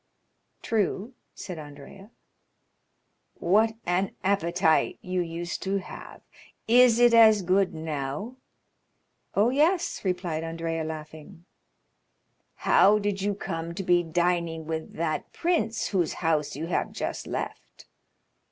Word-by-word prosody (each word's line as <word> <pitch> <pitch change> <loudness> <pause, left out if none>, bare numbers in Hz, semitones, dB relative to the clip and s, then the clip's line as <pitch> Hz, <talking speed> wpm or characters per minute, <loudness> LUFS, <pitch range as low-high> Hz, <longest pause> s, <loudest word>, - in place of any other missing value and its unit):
"True," 215 +2 -1 0.2
said 180 -4 -7
Andrea. 145 +7 -12 1.3
"What 215 +5 +2
an 180 +2 0
appetite 175 -4 +2
you 180 0 -1
used 170 +1 -4
to 195 +1 -1
have! 190 - -9 0.5
Is 240 0 +6
it 240 -1 +6
as 220 -3 +7
good 185 0 +2
now?" 155 - -4 1.0
"Oh, 215 +5 +3
yes," 335 +6 +1
replied 180 -4 -2
Andrea, 165 0 -3
laughing. 155 +1 -9 1.2
"How 205 +2 +6
did 205 -2 -2
you 205 +1 0
come 165 -3 -5
to 195 - -4
be 175 -1 +3
dining 170 -1 -1
with 160 0 -5
that 160 -1 -3
prince 230 -11 0
whose 180 -5 0
house 155 -5 -1
you 155 +3 -4
have 170 - -1
just - - -4
left?" - - -6
180 Hz, 115 wpm, -26 LUFS, 165-205 Hz, 1.3 s, as